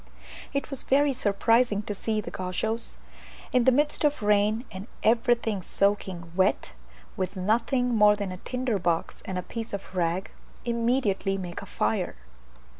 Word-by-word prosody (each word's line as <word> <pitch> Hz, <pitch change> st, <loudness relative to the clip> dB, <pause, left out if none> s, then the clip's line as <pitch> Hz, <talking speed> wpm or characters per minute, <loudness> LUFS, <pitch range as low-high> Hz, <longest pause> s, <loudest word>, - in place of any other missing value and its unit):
It 280 Hz, +1 st, -3 dB
was 275 Hz, -, -2 dB
very 280 Hz, +1 st, +3 dB
surprising 225 Hz, -1 st, +2 dB
to 210 Hz, -, -3 dB
see 215 Hz, +1 st, -1 dB
the -, -, -8 dB
Gauchos, 220 Hz, +5 st, -2 dB, 0.5 s
in 250 Hz, -2 st, +3 dB
the 260 Hz, -, +7 dB
midst 295 Hz, +4 st, +1 dB
of 295 Hz, -5 st, +1 dB
rain 210 Hz, +3 st, +2 dB
and 190 Hz, +1 st, -7 dB, 0.2 s
everything 230 Hz, -2 st, +2 dB
soaking 185 Hz, -3 st, 0 dB
wet, 185 Hz, -, +2 dB, 0.4 s
with 185 Hz, +1 st, -3 dB
nothing 235 Hz, +6 st, +1 dB
more 210 Hz, -2 st, +6 dB
than 200 Hz, -2 st, -4 dB
a 185 Hz, -, -6 dB
tinder 250 Hz, 0 st, -2 dB
box 170 Hz, -2 st, -1 dB
and 190 Hz, -, -3 dB
a 180 Hz, -, -2 dB
piece 225 Hz, +2 st, -6 dB
of 200 Hz, -1 st, -6 dB
rag, 175 Hz, +2 st, 0 dB, 0.3 s
immediately 230 Hz, -5 st, +1 dB
make 175 Hz, -2 st, -6 dB
a -, -, -10 dB
fire. -, -, -1 dB
210 Hz, 155 wpm, -27 LUFS, 190-240 Hz, 0.5 s, the